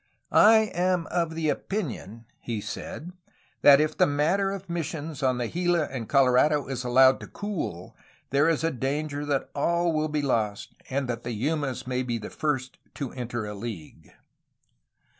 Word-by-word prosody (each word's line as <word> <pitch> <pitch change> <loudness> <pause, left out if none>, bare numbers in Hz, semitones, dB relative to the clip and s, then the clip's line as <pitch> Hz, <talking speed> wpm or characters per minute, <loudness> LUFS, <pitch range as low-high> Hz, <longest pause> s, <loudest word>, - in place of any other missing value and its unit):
*'I 220 -1 +6
am 180 -1 +1
of 165 -2 0
the 160 -1 -1
opinion,^' 125 - -4
he 115 -3 -4
said, 180 - -6 0.5
''that 140 -1 +9
if 155 0 +1
the 185 - +4
matter 160 +7 +1
of 195 -1 -6
missions 160 -3 -4
on 130 -2 +2
the 120 -1 -1
Gila 175 +2 +1
and 120 -5 -5
Colorado 140 +2 +4
is 130 -2 -4
allowed 130 +1 +5
to - - -9
cool... 165 - -5 0.4
there 140 +4 +4
is 165 - +1 0.2
danger 145 +2 -2
that 140 -2 -1
all 170 +3 +1
will 155 0 0
be 150 -1 -1
lost 110 -6 -1 0.2
and 135 0 -1
that 120 -1 -3
the 120 0 -4
Yumas 135 -2 -1
may 125 0 -1
be 120 -2 -2
the 105 - -8
first 130 -4 -2 0.2
to 140 -4 -4
enter 120 -3 -4
a 105 - -5
league." 100 -7 -8
145 Hz, 165 wpm, -26 LUFS, 125-165 Hz, 0.5 s, that